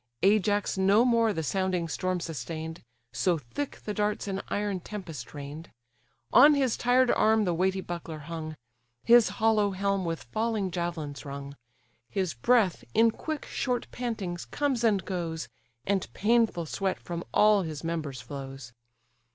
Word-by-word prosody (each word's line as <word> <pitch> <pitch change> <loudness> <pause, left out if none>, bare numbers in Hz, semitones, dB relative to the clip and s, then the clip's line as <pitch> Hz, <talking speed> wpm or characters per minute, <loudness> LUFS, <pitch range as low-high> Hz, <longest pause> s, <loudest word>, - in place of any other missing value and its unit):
Ajax 205 0 +2
no 200 +5 +5
more 230 -2 +3
the 160 -5 -2
sounding 185 0 0
storm 185 +2 -1
sustain'd, 160 +1 -5 0.3
So 180 -3 +2
thick 160 - -6
the 210 - -2
darts 210 0 -1
an 195 0 -2
iron 205 -2 -1
tempest 165 - -8
rain'd: 145 +3 -8 0.6
On 290 +4 +8
his 265 -5 +2
tired 250 +1 +3
arm 220 0 +4
the 175 - +1
weighty 190 +2 +1
buckler 170 -3 -6
hung; 155 +1 -6 0.5
His 235 -1 +6
hollow 215 -2 +3
helm 195 0 0
with 165 -6 -3
falling 215 - -1
javelins 170 -5 -4
rung; 140 0 -7 0.5
His 190 -3 -1
breath, 195 - +2
in 225 0 +5
quick 310 +5 -5
short 250 -3 -1
pantings, 210 -8 -3
comes 275 -5 -1
and 205 -5 +2
goes; 165 -4 -3 0.4
And 195 -2 0
painful 220 -5 +2
sweat 190 +4 -2
from 170 -1 -5
all 210 -1 +5
his 155 -4 -5
members 155 -6 -3
flows. 135 -3 -8
190 Hz, 145 wpm, -28 LUFS, 160-215 Hz, 0.6 s, On